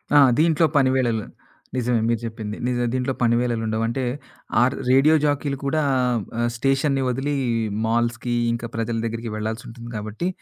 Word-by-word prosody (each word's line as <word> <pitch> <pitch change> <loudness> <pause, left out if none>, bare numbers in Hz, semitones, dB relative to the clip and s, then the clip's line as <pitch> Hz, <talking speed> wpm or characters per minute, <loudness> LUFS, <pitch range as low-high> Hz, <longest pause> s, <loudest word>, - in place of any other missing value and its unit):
ఆ! - - +9 0.2
దీంట్లో 165 0 +4
పనివేళలు 130 -5 +2 0.5
నిజమే 125 -2 +1
మీరు 115 -1 +1
చెప్పింది, 110 -2 -5
నిజమే 120 -1 0
దీంట్లో 130 +1 0
పనివేళలు 120 0 +2
ఉండవు. 110 +1 -1
అంటే 130 +3 -2 0.6
ఆర్ 125 +1 +3 0.2
రేడియో 135 +5 +5
జాకీలు 145 -1 0
కూడా 155 +3 +1 0.6
ఆహ్ 120 0 +1
స్టేషన్‌ని 135 +2 +1
వదిలి 135 +4 -1 0.5
మాల్స్‌కీ 120 +1 0 0.2
ఇంకా 115 0 -4
ప్రజల 115 0 -1
దగ్గరికి 115 0 -4
వెళ్ళాల్సుంటుంది, 110 +2 -5
గాబట్టి 110 - -3
120 Hz, 140 wpm, -23 LUFS, 115-135 Hz, 0.6 s, ఆ